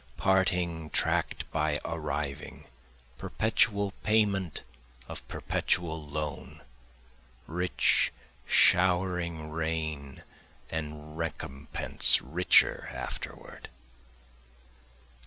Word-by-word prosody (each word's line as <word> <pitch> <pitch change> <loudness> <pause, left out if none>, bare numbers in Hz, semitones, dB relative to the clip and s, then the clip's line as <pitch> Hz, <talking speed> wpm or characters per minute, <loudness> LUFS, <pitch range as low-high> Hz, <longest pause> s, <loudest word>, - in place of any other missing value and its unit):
Parting 90 -4 +1
track'd - - 0
by 75 -1 0
arriving, 75 0 -4 0.5
perpetual 100 -2 +1
payment 100 -5 +1 0.4
of - - -8
perpetual 80 -2 -1
loan, 75 -1 -6 0.8
Rich 90 +2 +2 0.4
showering 90 -3 +3
rain, 80 -3 -3 0.5
and 75 -1 -5
recompense 70 -4 +2
richer 85 +7 +3
afterward. - - -7
80 Hz, 65 wpm, -29 LUFS, 75-90 Hz, 0.8 s, showering